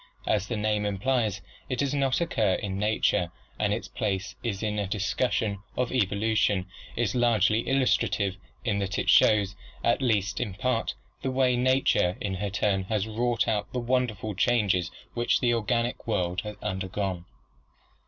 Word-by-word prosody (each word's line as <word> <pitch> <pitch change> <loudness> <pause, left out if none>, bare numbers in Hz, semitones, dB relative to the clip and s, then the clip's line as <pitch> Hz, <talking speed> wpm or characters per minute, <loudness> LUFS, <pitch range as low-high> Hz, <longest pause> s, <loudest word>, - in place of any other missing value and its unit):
As 100 -1 +1
the 120 - -2
name 105 0 0
implies, 105 0 0 0.3
it 125 - -1
does 140 +1 0
not 135 +1 +1
occur 110 - +1
in 95 -1 -3
nature 105 -4 +1 0.3
and 105 -1 +1
its 110 +3 -2
place 95 -1 -2
in 105 -2 -2
a 100 - -1
discus 105 +5 0
sion 100 -3 -1 0.2
of 125 -1 0
evolution 105 -3 +1 0.3
is 115 -4 0
largely 110 -3 +3
illustrative, 120 -7 +2 0.3
in 105 -4 +1
that 100 0 -2
it - - +2
shows, 100 -3 +5 0.3
at 120 - +2
least 105 -6 +1
in 105 -6 -3
part, 115 - -1 0.3
the 130 - -1
way 130 -1 +2
nature 125 -7 +2
in 100 -2 -2
her 100 +2 -2
turn 95 -1 0
has 105 0 0
wrought 115 0 0
out 105 -2 -1
the 125 - 0
wonderful 120 -4 -1
changes 100 -4 +2 0.2
which 120 0 +2
the 120 -2 +2
organic 115 +2 -1
world 90 -4 0
has 105 0 -6
undergone. 95 -2 -3
105 Hz, 160 wpm, -27 LUFS, 100-120 Hz, 0.3 s, shows